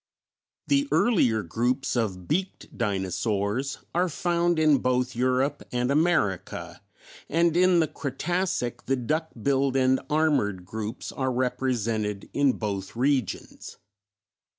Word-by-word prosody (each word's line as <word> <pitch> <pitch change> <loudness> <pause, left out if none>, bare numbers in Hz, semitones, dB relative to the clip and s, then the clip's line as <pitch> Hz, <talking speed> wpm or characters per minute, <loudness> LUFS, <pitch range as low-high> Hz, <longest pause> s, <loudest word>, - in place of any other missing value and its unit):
The 285 0 +2
earlier 120 - +3
groups 120 +11 -1
of 95 -7 -2
Beaked 185 +3 -3
Dinosaurs 100 +4 -1 0.2
are 180 +1 +2
found 175 +1 +1
in 155 -3 +4
both 125 0 0
Europe 130 +3 +1
and 125 +1 0
America, 150 - 0 0.5
and 170 +1 +2
in 180 0 +5
the 160 - +1
Cretacic 155 0 -2
the 135 - +2
Duck 155 +6 -1
billed 135 +2 +1
and 130 0 +3
Armored 140 - +1
groups 110 +3 -5
are 130 -1 -1
represented 115 -5 -1
in 140 -2 +3
both 100 -2 -4
regions. 130 -3 -2
130 Hz, 115 wpm, -26 LUFS, 110-155 Hz, 0.5 s, in